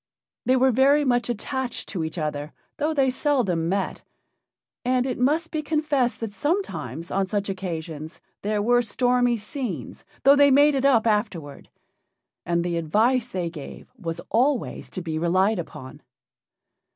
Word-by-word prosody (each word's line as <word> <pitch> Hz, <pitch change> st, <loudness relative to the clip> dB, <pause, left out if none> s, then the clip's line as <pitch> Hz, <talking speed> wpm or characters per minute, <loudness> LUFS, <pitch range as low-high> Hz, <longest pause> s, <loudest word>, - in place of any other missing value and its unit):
They 255 Hz, -, +5 dB
were 260 Hz, 0 st, +4 dB
very 280 Hz, +4 st, +4 dB
much 245 Hz, -2 st, +1 dB
attached 245 Hz, +2 st, -3 dB
to 175 Hz, -5 st, -3 dB
each 160 Hz, +2 st, -5 dB
other, 150 Hz, -1 st, -3 dB, 0.2 s
though 300 Hz, +1 st, 0 dB
they 270 Hz, -4 st, +2 dB
seldom 235 Hz, -, 0 dB
met, 195 Hz, +1 st, -1 dB, 0.8 s
and 250 Hz, 0 st, +1 dB
it 255 Hz, -, -3 dB
must 310 Hz, +6 st, +1 dB
be 310 Hz, -, -1 dB
confessed 295 Hz, -6 st, 0 dB
that 220 Hz, -3 st, -4 dB
sometimes 295 Hz, -, -2 dB
on 195 Hz, -1 st, 0 dB
such 205 Hz, 0 st, -2 dB
occasions 165 Hz, -4 st, -5 dB, 0.2 s
there 210 Hz, 0 st, 0 dB
were 245 Hz, +2 st, +4 dB
stormy 245 Hz, +1 st, +2 dB
scenes, 210 Hz, -, -6 dB, 0.2 s
though 275 Hz, +1 st, +7 dB
they 285 Hz, 0 st, +6 dB
made 290 Hz, +2 st, +5 dB
it 270 Hz, 0 st, 0 dB
up 245 Hz, -5 st, +4 dB
afterward. 205 Hz, -10 st, -1 dB, 0.8 s
And 170 Hz, 0 st, +1 dB
the 175 Hz, -1 st, -1 dB
advice 225 Hz, +10 st, +2 dB
they 180 Hz, -8 st, -3 dB
gave 150 Hz, -4 st, -10 dB
was 170 Hz, -7 st, -5 dB
always 250 Hz, +4 st, 0 dB
to 185 Hz, -, -6 dB
be 160 Hz, -2 st, -3 dB
relied 185 Hz, +5 st, +2 dB
upon. 150 Hz, -6 st, -8 dB
225 Hz, 150 wpm, -24 LUFS, 175-265 Hz, 0.8 s, though